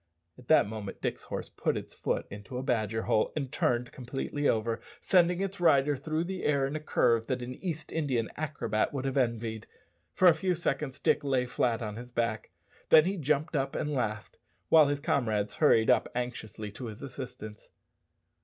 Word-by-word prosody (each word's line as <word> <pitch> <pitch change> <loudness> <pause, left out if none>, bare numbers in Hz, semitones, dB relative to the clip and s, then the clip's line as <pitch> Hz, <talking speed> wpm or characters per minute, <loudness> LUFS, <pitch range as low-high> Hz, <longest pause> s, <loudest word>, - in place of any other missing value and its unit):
At 125 -1 -17
that 155 - +5
moment 105 -2 -6
Dick's - - -3
horse - - -5
put - - -1
its - - -7
foot - - -2
into 105 +5 -7
a 130 - -3
badger 110 -3 0
hole 110 - +2
and 140 -4 -3
turned 120 0 0
completely 135 +3 -2
over, 115 +1 0 0.2
sending 180 -3 +3
its 195 0 -3
rider 145 -4 +4
through 155 +4 -2
the 185 +1 -5
air 140 -2 +2
in 140 +3 -3
a - - -1
curve 115 -6 +2
that 130 -1 -2
an 125 +1 -5
East 160 +1 -5
Indian 130 -8 0
acrobat 145 -6 -1
would 135 -1 -2
have 135 - -1
envied. 115 -4 -1 0.5
For 185 - +5
a 175 - +9
few 185 +2 0
seconds 140 -4 -2
Dick - - +2
lay 130 -3 +1
flat 120 -1 0
on 105 -1 -5
his 120 +1 -8
back, 115 -2 -2 0.4
then 155 0 +8
he 190 +2 0
jumped 150 -1 0
up 135 -1 -1
and 150 - -1
laughed, 110 -5 -3 0.3
while 155 -3 +7
his 145 0 0
comrades 110 -7 0
hurried 115 -8 +5
up - - +2
anxiously 110 -4 -4
to 125 +5 -8
his 110 +4 -9
assistance. 125 -5 -8
130 Hz, 190 wpm, -30 LUFS, 115-150 Hz, 0.5 s, a